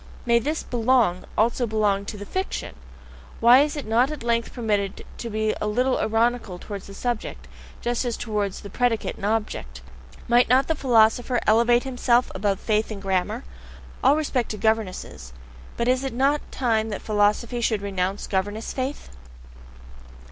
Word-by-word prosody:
May 235 Hz, -1 st, +4 dB
not 235 Hz, -, -9 dB
this 310 Hz, +2 st, -1 dB
"belong" 235 Hz, -6 st, +1 dB
also 235 Hz, +2 st, +2 dB
belong 210 Hz, -2 st, +1 dB
to 210 Hz, -, -6 dB
the 205 Hz, -, -7 dB
fiction? 375 Hz, -, -4 dB, 0.7 s
Is 270 Hz, +6 st, +6 dB
it 290 Hz, -, -5 dB
not 235 Hz, +5 st, +3 dB
at 305 Hz, -5 st, -6 dB
length 235 Hz, 0 st, 0 dB
permitted 205 Hz, -5 st, -2 dB
to 235 Hz, -, -4 dB
be 215 Hz, 0 st, 0 dB
a 210 Hz, -, 0 dB
little 250 Hz, +5 st, +1 dB
ironical 225 Hz, -3 st, 0 dB
towards 200 Hz, +1 st, -8 dB
the 195 Hz, -, -10 dB
subject, 240 Hz, +1 st, -4 dB, 0.3 s
just 240 Hz, +1 st, -1 dB
as 240 Hz, -2 st, -2 dB
towards 210 Hz, -4 st, -2 dB
the 200 Hz, -, -10 dB
predicate 245 Hz, -1 st, 0 dB
and -, -, -5 dB
object? 205 Hz, -, -3 dB, 0.5 s
Might 240 Hz, 0 st, +4 dB
not 260 Hz, +2 st, +5 dB
the 320 Hz, -, +2 dB
philosopher 245 Hz, -2 st, +3 dB
elevate 235 Hz, +2 st, +4 dB
himself 250 Hz, -2 st, +1 dB
above 195 Hz, 0 st, -1 dB
faith 215 Hz, 0 st, 0 dB
in 210 Hz, -, -5 dB
grammar? 195 Hz, +5 st, -1 dB, 0.6 s
All 275 Hz, +2 st, +6 dB
respect 280 Hz, -6 st, -1 dB
to 215 Hz, -, -4 dB
governesses, 200 Hz, -, -2 dB, 0.4 s
but 235 Hz, -, 0 dB
is 255 Hz, +1 st, +2 dB
it 270 Hz, -, -3 dB
not 275 Hz, +4 st, +2 dB
time 225 Hz, -4 st, 0 dB
that 205 Hz, -, -5 dB
philosophy 215 Hz, +3 st, +1 dB
should 220 Hz, -3 st, 0 dB
renounce 195 Hz, 0 st, -2 dB
governess 205 Hz, +3 st, -2 dB
faith? 265 Hz, +2 st, -4 dB
225 Hz, 160 wpm, -24 LUFS, 205-245 Hz, 0.7 s, Is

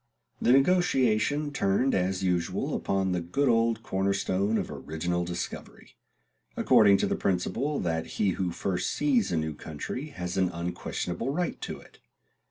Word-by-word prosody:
The -, -, +4 dB
negotiation 145 Hz, -, +3 dB
turned 125 Hz, +3 st, +1 dB
as 95 Hz, +1 st, 0 dB
usual 90 Hz, -2 st, 0 dB
upon 95 Hz, -1 st, 0 dB
the 90 Hz, -1 st, 0 dB
good 115 Hz, +12 st, 0 dB
old 115 Hz, -1 st, +2 dB
corner 95 Hz, -1 st, 0 dB
stone 100 Hz, +2 st, 0 dB
of -, -, -3 dB
original 85 Hz, +3 st, -2 dB
discovery; 85 Hz, 0 st, -6 dB, 0.6 s
according 100 Hz, -2 st, +6 dB
to -, -, +1 dB
the -, -, 0 dB
principle 120 Hz, +10 st, -1 dB
that 80 Hz, -2 st, -1 dB
he 100 Hz, -2 st, +2 dB
who 90 Hz, 0 st, -1 dB
first 90 Hz, +1 st, -2 dB
sees 260 Hz, -7 st, +1 dB
a 85 Hz, -, +1 dB
new 80 Hz, -1 st, -1 dB
country 80 Hz, -, -6 dB
has 90 Hz, -9 st, -5 dB
an 95 Hz, -1 st, +2 dB
unquestionable 90 Hz, +4 st, -4 dB
right 175 Hz, +5 st, -2 dB
to -, -, -5 dB
it. -, -, -19 dB
95 Hz, 155 wpm, -28 LUFS, 90-125 Hz, 0.6 s, according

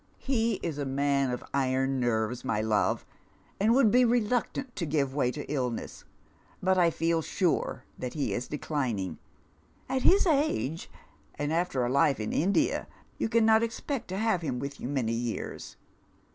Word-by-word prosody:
" -, -, -35 dB
He 230 Hz, -4 st, 0 dB
is 160 Hz, -4 st, -3 dB
a -, -, 0 dB
man 140 Hz, 0 st, +1 dB
of 125 Hz, 0 st, -3 dB
iron 135 Hz, 0 st, +1 dB
nerves, 120 Hz, 0 st, 0 dB
my 115 Hz, -5 st, 0 dB
love, 110 Hz, -1 st, +1 dB, 0.5 s
and 210 Hz, +3 st, +3 dB
would 250 Hz, -6 st, +5 dB
be 250 Hz, +3 st, +5 dB
reluctant 245 Hz, +2 st, 0 dB
to 170 Hz, -, -2 dB
give 140 Hz, -3 st, 0 dB
way 135 Hz, -3 st, +1 dB
to 145 Hz, +3 st, -5 dB
illness, 125 Hz, -5 st, -3 dB, 0.5 s
but 190 Hz, 0 st, +2 dB
I 175 Hz, -2 st, +4 dB
feel 165 Hz, 0 st, 0 dB
sm 185 Hz, -, -2 dB
e 170 Hz, -, +3 dB, 0.4 s
that 125 Hz, -1 st, -5 dB
he 145 Hz, -, -1 dB
is 125 Hz, -, -3 dB
declining. 130 Hz, -, -2 dB, 0.7 s
At 265 Hz, -, -1 dB
his 390 Hz, +8 st, +5 dB
age, 285 Hz, -, 0 dB, 0.5 s
and 145 Hz, +1 st, -2 dB
after 165 Hz, -7 st, 0 dB
a -, -, -1 dB
Ufe 140 Hz, -1 st, +3 dB
in 105 Hz, -, -3 dB
India, 190 Hz, +6 st, +1 dB, 0.3 s
you -, -, 0 dB
cannot 220 Hz, -1 st, +5 dB
expect 230 Hz, +3 st, -3 dB
to 185 Hz, -, -4 dB
have 215 Hz, -4 st, +1 dB
hiui 135 Hz, -6 st, -2 dB
with 140 Hz, +2 st, -5 dB
you -, -, -4 dB
many 130 Hz, -5 st, -1 dB
years." 115 Hz, -, -4 dB
145 Hz, 175 wpm, -29 LUFS, 130-215 Hz, 0.7 s, would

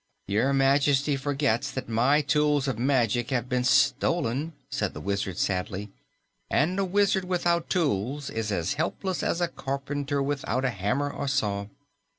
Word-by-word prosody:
"Your 110 Hz, +7 st, +1 dB
Majesty 140 Hz, +1 st, +3 dB
forgets 140 Hz, -2 st, 0 dB
that 130 Hz, -1 st, -5 dB
my 125 Hz, +7 st, +3 dB
tools 150 Hz, -1 st, +2 dB
of 125 Hz, -4 st, -2 dB
magic 120 Hz, -3 st, +1 dB
have 125 Hz, -2 st, -1 dB
been 125 Hz, 0 st, 0 dB
stolen," 140 Hz, +2 st, +2 dB, 0.2 s
said -, -, -2 dB
the -, -, -5 dB
Wizard 100 Hz, +1 st, -2 dB
sadly, 95 Hz, +2 st, -2 dB, 0.6 s
"and 175 Hz, +7 st, +1 dB
a -, -, +2 dB
wizard 195 Hz, 0 st, +2 dB
without 175 Hz, -2 st, 0 dB
tools 140 Hz, -, -1 dB
is 110 Hz, -1 st, -2 dB
as 90 Hz, +5 st, 0 dB
helpless 180 Hz, +4 st, -2 dB
as 170 Hz, -, -1 dB
a 175 Hz, -, +2 dB
carpenter 140 Hz, 0 st, -3 dB
without 135 Hz, -2 st, -1 dB
a 125 Hz, -, +1 dB
hammer 120 Hz, +8 st, -1 dB
or 140 Hz, -, -4 dB
saw." 105 Hz, -7 st, 0 dB
135 Hz, 155 wpm, -27 LUFS, 115-145 Hz, 0.6 s, Majesty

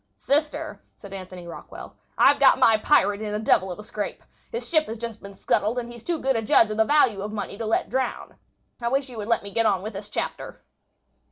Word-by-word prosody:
"Sister," 295 Hz, +2 st, -1 dB
said 200 Hz, -2 st, -12 dB
Anthony 185 Hz, -2 st, -8 dB
Rockwall. 170 Hz, -, -10 dB, 0.2 s
"I've -, -, +5 dB
got -, -, +6 dB
my 225 Hz, -, +5 dB
pirate 210 Hz, -3 st, +2 dB
in 210 Hz, -1 st, -3 dB
a -, -, -1 dB
devil 190 Hz, -3 st, +2 dB
of 175 Hz, -, -6 dB
a 210 Hz, -, -9 dB
scrape. 210 Hz, -1 st, -5 dB, 0.3 s
His 470 Hz, 0 st, -4 dB
ship 315 Hz, -2 st, +2 dB
has 225 Hz, -, -5 dB
just 230 Hz, -1 st, -6 dB
been 200 Hz, 0 st, -10 dB
scuttled, 215 Hz, +4 st, 0 dB
and 240 Hz, -1 st, -4 dB
he's 235 Hz, -1 st, -11 dB
too 345 Hz, -1 st, -1 dB
good 270 Hz, -3 st, 0 dB
a 225 Hz, -, +1 dB
judge 215 Hz, 0 st, +4 dB
of 215 Hz, -, -3 dB
the 220 Hz, -, +4 dB
value 240 Hz, -7 st, +3 dB
of 210 Hz, +1 st, -4 dB
money 210 Hz, -1 st, -5 dB
to 225 Hz, -, -3 dB
let 220 Hz, -, 0 dB
drown. 260 Hz, -1 st, -3 dB, 0.4 s
I 235 Hz, -, -1 dB
wish 270 Hz, +2 st, 0 dB
you 245 Hz, -, -10 dB
would 210 Hz, -, -5 dB
let 230 Hz, -2 st, +1 dB
me 200 Hz, -1 st, -8 dB
go 230 Hz, -, +2 dB
on 190 Hz, -2 st, +1 dB
with 215 Hz, +1 st, -5 dB
this 200 Hz, +1 st, -7 dB
chapter." -, -, -5 dB
220 Hz, 240 wpm, -25 LUFS, 205-240 Hz, 0.4 s, got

